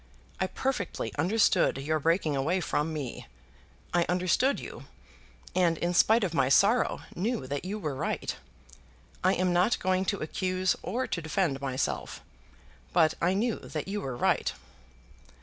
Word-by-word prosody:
I - - +1
perfectly 200 - -3
understood 195 -2 +3
your 155 +3 -1
breaking 165 -1 +1
away 155 +8 +1
from 160 -2 -1
me. 140 - -5 0.7
I 175 -1 +2
understood 185 +10 +2
you, - - -9 0.7
and 175 -3 +2
in 175 +2 -1
spite 220 +5 +5
of 180 -4 -1
my 130 -5 +2
sorrow 205 - +4
knew 215 - -1
that 140 +5 -4
you 200 +3 -3
were 155 -9 -3
right. 135 - -2 0.9
I 185 +1 +4
am 180 0 +1
not 180 +6 +3
going 185 0 0
to 200 - 0
accuse 185 +3 0
or 245 +7 -2
to 170 - -3
defend 160 -4 0
myself; 135 -1 -3 0.7
but 160 -3 +4
I 180 +3 +2
knew 225 +3 0
that 155 +1 -5
you 205 +1 -3
were 130 -3 -4
right." - - +1
180 Hz, 150 wpm, -29 LUFS, 155-195 Hz, 0.9 s, spite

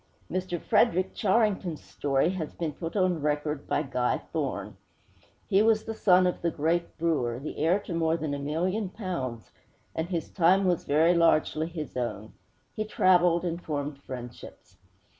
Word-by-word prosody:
Mr. 185 -1 -2
Frederick 190 -4 +2
Charrington's 200 -6 +1
story 140 +3 0
has 170 -5 -5
been 160 -3 -3
put 165 +5 -6
on 185 -5 +1
record 150 0 -1
by 150 - +1
Guy 125 -3 0 0.2
Thorne. - - -3 0.7
He 195 - +4
was 220 0 +3
the 225 - -4
son 185 -4 +4
of 180 - -1
the 170 - +1
great 165 +2 -1
brewer, 150 -8 0
the 140 +4 -6
heir 165 +5 +3
to 180 - -6
more 165 0 +1
than 155 -3 -3
a 140 - -3
million 180 +8 -1
pounds, 170 - -5 0.4
and 160 +2 -3
his 170 -3 -3
time 185 +2 +4
was 180 -1 +1
very 160 +4 +4
largely 165 -2 +2
his 160 -4 -7
own. 120 -3 -4 0.4
He 215 - -1
traveled 180 -4 +3
and 170 0 -3
formed 145 -2 -3
friendships. 125 -3 -10
170 Hz, 160 wpm, -28 LUFS, 150-185 Hz, 0.7 s, He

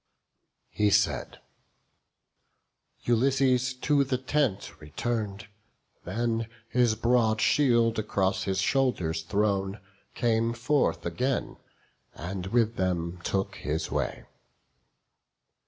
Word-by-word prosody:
He 105 0 +2
said; - - +1 1.7
Ulysses 130 +1 +2
to 145 -2 +3
the 130 -1 -1
tent 130 - -1
return'd; 105 +6 -3 0.6
Then, 115 +4 -1 0.2
his 120 -3 +3
broad 115 -1 +2
shield 120 -3 +3
across 95 -2 0
his 95 -1 0
shoulders 95 -11 +1
thrown, 100 +2 0 0.4
Came 115 -1 +1
forth 135 +5 0
again, 130 +1 -1 0.6
and 90 +3 -5
with 115 +1 +1
them 90 -1 -1
took 95 +2 -2
his 75 +2 -3
way. - - -2
115 Hz, 90 wpm, -28 LUFS, 95-125 Hz, 1.7 s, to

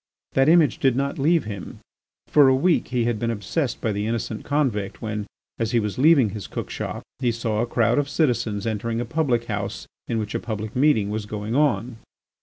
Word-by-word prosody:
That 135 +2 +4
image 160 -8 +4
did 130 -3 +3
not 140 +1 -1
leave 160 +3 +3
him. 100 -3 -7 0.5
For 145 -2 +5
a 130 - +5
week 170 +6 +2
he 125 -2 0
had 120 -2 0
been 115 - -1
obsessed 115 - -2
by 110 - 0
the 105 +1 -2
innocent 115 -1 -3
convict, 125 -10 -1
when, 105 -2 -4 0.3
as 115 0 -1
he 120 - +4
was 105 +1 -3
leaving 140 -7 +5
his 105 -1 -6
cook - - -5
shop, - - -5 0.2
he 125 -3 +1
saw 115 -2 -1
a 120 - -1
crowd 120 +2 +2
of 145 -1 -1
citizens 120 -9 0
entering 115 +1 -2
a 120 - -2
public 120 -3 0
house 105 -3 -4 0.2
in 115 - -1
which 105 -1 -3
a - - -1
public 110 -2 -5
meeting 125 -7 +3
was 105 -1 -3
going 105 +1 -4
on. 125 -4 +1
115 Hz, 210 wpm, -23 LUFS, 110-135 Hz, 0.5 s, For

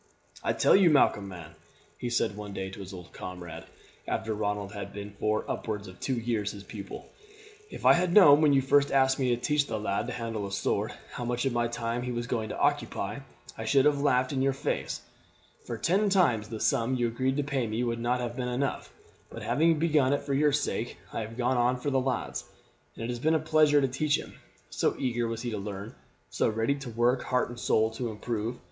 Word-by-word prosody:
"I - - +1
tell - - +4
you, 195 -3 +6
Malcolm, 115 -9 +3
man," 85 -4 -9 0.5
he 120 - -3
said 115 -4 0
one 105 -1 -7
day 95 0 -4
to 95 - -10
his 95 -1 -8
old 90 -2 -10
comrade, 85 -3 -8 0.4
after 110 - -1
Ronald 105 -1 -2
had 100 -1 -6
been 100 0 -7
for 110 0 0
upwards 105 -2 -3
of 90 0 -12
two 130 - -1
years 115 -3 -1
his 100 -1 -9
pupil, 100 -2 -8 0.6
"if - - -9
I - - +9
had 175 0 +1
known, 155 -7 +8
when 150 -2 +5
you 135 -1 +4
first 140 +1 +3
asked 135 0 +3
me 130 -2 +1
to 120 -1 +1
teach 145 +3 +1
the 110 -1 -3
lad 105 +2 -1
to - - -4
handle 115 -4 -3
a - - -8
sword, 100 - -1 0.2
how 120 - -5
much 120 +2 -1
of 135 - +1
my 120 0 +1
time 115 0 -3
he 125 0 -3
was 120 0 -2
going 115 -2 -2
to - - -5
occupy, 105 +5 0 0.4
I 110 - -6
should 135 +5 +4
have 145 -1 +3
laughed 130 -2 +2
in 130 - 0
your 135 0 +2
face, 135 - -3 0.7
for - - -3
ten 200 +4 +2
times 125 - +2
the 110 -2 -5
sum 130 -1 +1
you 120 -1 +1
agreed 130 +4 0
to 145 - +1
pay 135 -4 -1
me 110 +3 -1
would 115 -1 -1
not 125 +1 0
have 120 -1 -4
been 125 -1 -2
enough; 130 +3 -2 0.4
but, - - -8
having 155 +9 +3
begun 150 -4 +3
it 145 - -1
for 140 - -2
your 145 +2 +3
sake, 135 -5 -1 0.2
I - - -2
have 110 +1 -7
gone 125 +1 +1
on 125 +1 +2
for 145 +2 -2
the 135 -1 +2
lad's. 130 -2 -2 0.5
It 115 - -5
has 120 -1 -3
been 160 +5 +2
a - - +3
pleasure 155 -1 +4
to 135 - +2
teach 145 +3 +1
him, - - -9 0.4
so - - +1
eager 120 -2 -1
was 115 +1 -4
he 120 - -2
to 105 - -3
learn 100 +3 -6 0.4
so - - +1
ready 115 +5 +1
to 135 -3 -7
work 120 +3 +2
heart 125 -2 +1
and 120 0 -8
soul 110 0 +2
to 115 +1 -3
improve. 110 +2 -3
120 Hz, 230 wpm, -28 LUFS, 110-135 Hz, 0.7 s, I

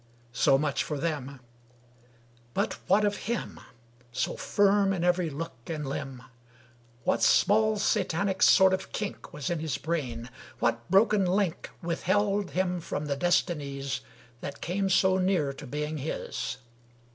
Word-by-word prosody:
So 135 - +4
much 145 -1 0
for 150 - -3
them. 140 -3 -3 1.2
But 200 +2 -1
what 205 +3 +4
of 205 0 +1
him 235 - -3 0.5
So 125 - -1
firm 200 -1 +3
in 175 -3 -2
every 180 -1 +2
look 145 -3 -6
and 155 -2 -3
limb? 135 -2 -5 0.8
What - - +1
small 215 +1 +4
satanic 195 -2 0
sort 190 0 +7
of 190 0 -3
kink 210 -2 -5
Was 150 +1 -4
in 170 - -1
his 155 -3 -2
brain? 125 -8 -3 0.3
What 115 0 -1
broken 200 +1 +4
link 185 -2 0
Withheld 195 +3 0
hom 180 -1 0
from 150 -2 -4
the 145 -1 -1
destinies 140 -5 0 0.4
That 140 - -7
came 195 +2 -1
so 190 0 +4
near 180 -7 +1
to 140 +1 -10
being 150 +3 -3
his? 135 -2 -4
170 Hz, 140 wpm, -28 LUFS, 140-195 Hz, 1.2 s, sort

